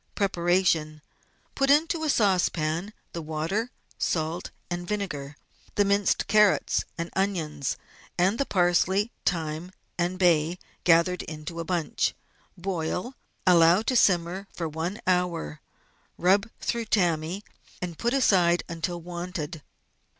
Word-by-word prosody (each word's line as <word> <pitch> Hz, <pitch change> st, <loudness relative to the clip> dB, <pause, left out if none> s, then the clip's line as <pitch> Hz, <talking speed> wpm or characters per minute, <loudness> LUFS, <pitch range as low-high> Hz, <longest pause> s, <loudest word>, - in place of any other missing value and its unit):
Preparation. 175 Hz, -5 st, +1 dB, 0.2 s
— -, -, -39 dB
Put 275 Hz, 0 st, +1 dB
into 320 Hz, +3 st, +3 dB
a 310 Hz, -, 0 dB
saucepan 180 Hz, -, +1 dB, 0.2 s
the 170 Hz, -, -4 dB
water, 160 Hz, +9 st, -2 dB, 0.3 s
salt, 160 Hz, +1 st, -1 dB, 0.2 s
and 175 Hz, 0 st, -4 dB
vinegar, 150 Hz, -9 st, -4 dB, 0.4 s
the 205 Hz, -, +3 dB
minced 200 Hz, 0 st, +2 dB
carrots 210 Hz, -2 st, +3 dB
and 170 Hz, 0 st, -4 dB
onions, 160 Hz, -8 st, -1 dB, 0.4 s
and 190 Hz, +5 st, +2 dB
the 275 Hz, -, +2 dB
parsley, 190 Hz, +4 st, +2 dB, 0.2 s
thyme, 160 Hz, 0 st, -1 dB, 0.3 s
and 175 Hz, +1 st, 0 dB
bay, 170 Hz, -2 st, +3 dB, 0.3 s
gathered 175 Hz, +1 st, +4 dB
into 155 Hz, +1 st, -7 dB
a -, -, -2 dB
bunch. 175 Hz, -3 st, 0 dB, 0.4 s
Boil, 180 Hz, +5 st, -3 dB, 0.3 s
allow 175 Hz, +2 st, +6 dB
to 255 Hz, -, 0 dB
simmer 185 Hz, -2 st, +2 dB
for 165 Hz, -, -4 dB
one 165 Hz, +7 st, -4 dB
hour, 180 Hz, -, 0 dB, 0.6 s
rub 200 Hz, +5 st, +3 dB
through 235 Hz, -1 st, -2 dB
tammy, 175 Hz, -2 st, 0 dB, 0.4 s
and 175 Hz, -3 st, -5 dB
put 240 Hz, +3 st, +1 dB
aside 180 Hz, -9 st, +4 dB
until 170 Hz, +1 st, -3 dB
wanted. 175 Hz, -2 st, -5 dB
175 Hz, 120 wpm, -27 LUFS, 165-195 Hz, 0.6 s, allow